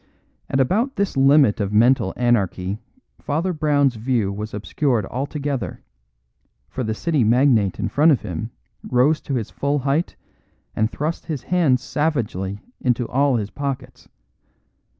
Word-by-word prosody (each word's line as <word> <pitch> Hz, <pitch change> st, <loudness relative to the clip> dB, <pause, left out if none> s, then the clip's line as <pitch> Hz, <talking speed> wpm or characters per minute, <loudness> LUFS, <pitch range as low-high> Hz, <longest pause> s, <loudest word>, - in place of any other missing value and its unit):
At 135 Hz, -, 0 dB
about 220 Hz, -, +1 dB
this 200 Hz, -1 st, -1 dB
limit 135 Hz, -4 st, +5 dB
of 100 Hz, -1 st, -1 dB
mental 110 Hz, -2 st, +3 dB
anarchy 100 Hz, -5 st, 0 dB, 0.4 s
Father 165 Hz, +5 st, -1 dB
Brown's 145 Hz, -5 st, +2 dB
view 110 Hz, -4 st, 0 dB
was 105 Hz, +2 st, -5 dB
obscured 115 Hz, +2 st, -1 dB
altogether; 140 Hz, +3 st, -4 dB, 0.8 s
for 130 Hz, -, -4 dB
the 110 Hz, -1 st, -2 dB
City 155 Hz, 0 st, +1 dB
magnate 115 Hz, -4 st, +3 dB
in -, -, -1 dB
front 155 Hz, +3 st, +4 dB
of 135 Hz, -, +2 dB
him 90 Hz, +6 st, -4 dB, 0.3 s
rose 135 Hz, +5 st, +2 dB
to 140 Hz, -, -3 dB
his 115 Hz, -4 st, -3 dB
full 140 Hz, +1 st, -1 dB
height 145 Hz, +5 st, -1 dB, 0.6 s
and 110 Hz, 0 st, +1 dB
thrust 155 Hz, +3 st, -3 dB
his 150 Hz, -7 st, -4 dB
hands 145 Hz, -7 st, +2 dB
savagely 105 Hz, -, -2 dB, 0.2 s
into 125 Hz, -2 st, 0 dB
all 140 Hz, +1 st, +2 dB
his 105 Hz, -3 st, -2 dB
pockets. 135 Hz, -2 st, -5 dB
130 Hz, 140 wpm, -21 LUFS, 110-145 Hz, 0.8 s, limit